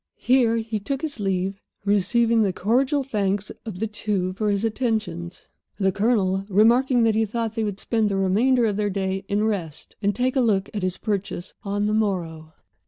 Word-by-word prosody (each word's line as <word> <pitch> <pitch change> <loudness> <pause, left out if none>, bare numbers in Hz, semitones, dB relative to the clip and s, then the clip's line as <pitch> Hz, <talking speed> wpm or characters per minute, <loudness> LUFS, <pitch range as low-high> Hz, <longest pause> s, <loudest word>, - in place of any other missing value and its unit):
Here 245 -3 +3
he 220 -1 -3
took 270 +7 -4
his 295 -6 -4
leave, 195 0 -1 0.2
receiving 225 +3 +3
the 200 -3 +2
cordial 255 - +1
thanks 205 -5 -1 0.2
of 190 -5 -6
the 220 - 0
two 205 -4 -2
for 210 +2 -1
his 200 +2 +1
attentions, 215 -7 -2 0.3
the 190 -2 +2
Colonel 200 -2 +1
remarking 235 +5 +4
that 225 -1 +3
he 220 +1 +2
thought 225 +1 -2
they 225 -1 -1
would 205 -2 -3
spend 220 -2 0
the 200 - -1
remainder 230 +6 +3
of 205 -2 0
the 210 -1 0
day 190 0 -2
in 205 +1 0
rest, 180 -9 -3
and 205 -1 +1
take 255 +4 0
a 265 - +3
look 200 -5 +1
at 205 - -3
his 185 -1 -1
purchase 200 -4 -3
on 205 0 -1
the 210 - 0
morrow. 170 -7 -2
210 Hz, 190 wpm, -24 LUFS, 195-230 Hz, 0.3 s, remarking